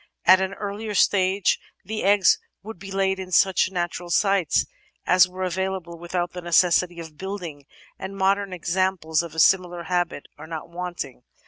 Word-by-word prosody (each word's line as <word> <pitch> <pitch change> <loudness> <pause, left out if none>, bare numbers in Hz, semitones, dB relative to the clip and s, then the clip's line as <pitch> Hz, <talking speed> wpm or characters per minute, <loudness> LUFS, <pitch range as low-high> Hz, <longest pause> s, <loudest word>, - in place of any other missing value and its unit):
At 185 +1 +7
an 190 +1 -2
earlier 210 +1 -5
stage 190 -1 +2 0.3
the 215 +3 -4
eggs 200 0 +4 0.2
would 220 -3 -9
be 195 +1 -9
laid 190 0 0
in 185 -1 -7
such 190 0 +3
natiu*al 175 -1 -3
sites 195 -2 +2 0.4
as 185 0 +5
were 185 +1 -6
available 185 -2 -3
with 175 +1 -8
out 175 -1 0
the 180 - -6
necessity 175 0 +2
of 160 -2 -10
building, 175 -8 -6 0.3
and 195 +1 -7
modern 195 0 +1
examples 180 -2 0
of 170 -2 -9
a - - -3
similar 175 0 +3
habit 175 -5 -1
are 155 - -9
not 160 0 -7
wanting. 175 -7 -6
185 Hz, 165 wpm, -24 LUFS, 170-190 Hz, 0.4 s, At